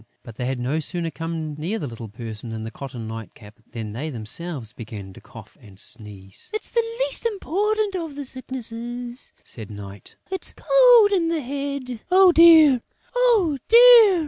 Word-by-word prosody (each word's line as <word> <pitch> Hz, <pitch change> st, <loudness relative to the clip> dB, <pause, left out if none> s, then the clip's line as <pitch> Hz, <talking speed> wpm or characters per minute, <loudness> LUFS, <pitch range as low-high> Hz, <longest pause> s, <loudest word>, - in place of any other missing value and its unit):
But 115 Hz, -, -11 dB
they 125 Hz, -, -3 dB
had 130 Hz, 0 st, -2 dB
no 130 Hz, +6 st, -1 dB
sooner 165 Hz, +1 st, -2 dB
come 165 Hz, -2 st, -5 dB
near 180 Hz, +9 st, -2 dB
the 160 Hz, -, -4 dB
little 115 Hz, -3 st, -8 dB
person 110 Hz, +1 st, -7 dB
in 110 Hz, 0 st, -5 dB
the 110 Hz, -, -6 dB
cotton 125 Hz, -5 st, -8 dB
night 115 Hz, 0 st, -8 dB
cap 105 Hz, +1 st, -16 dB
than 110 Hz, -3 st, -6 dB
they 145 Hz, +8 st, -4 dB
themselves 125 Hz, +1 st, -4 dB
began 105 Hz, -5 st, -9 dB
to -, -, -14 dB
cough -, -, -14 dB
and 100 Hz, -3 st, -16 dB
sneeze. 100 Hz, -5 st, -7 dB
"It's 430 Hz, -, -4 dB
the 470 Hz, -, +2 dB, 0.2 s
least -, -, 0 dB
important 420 Hz, 0 st, -1 dB
of 325 Hz, -5 st, -5 dB
the 285 Hz, -1 st, -6 dB
Sicknesses," 245 Hz, -1 st, -7 dB
said 110 Hz, -4 st, -6 dB
Night. 100 Hz, -2 st, -11 dB, 0.2 s
"It's 380 Hz, -, -4 dB
Cold -, -, +6 dB
in 355 Hz, -4 st, +2 dB
the 330 Hz, -2 st, -1 dB
Head." 275 Hz, -2 st, -5 dB
"Oh, 370 Hz, 0 st, +6 dB
dear, 320 Hz, -6 st, +7 dB, 0.3 s
oh, 440 Hz, -, +3 dB
dear!" 465 Hz, -5 st, +8 dB
220 Hz, 170 wpm, -23 LUFS, -, 0.3 s, dear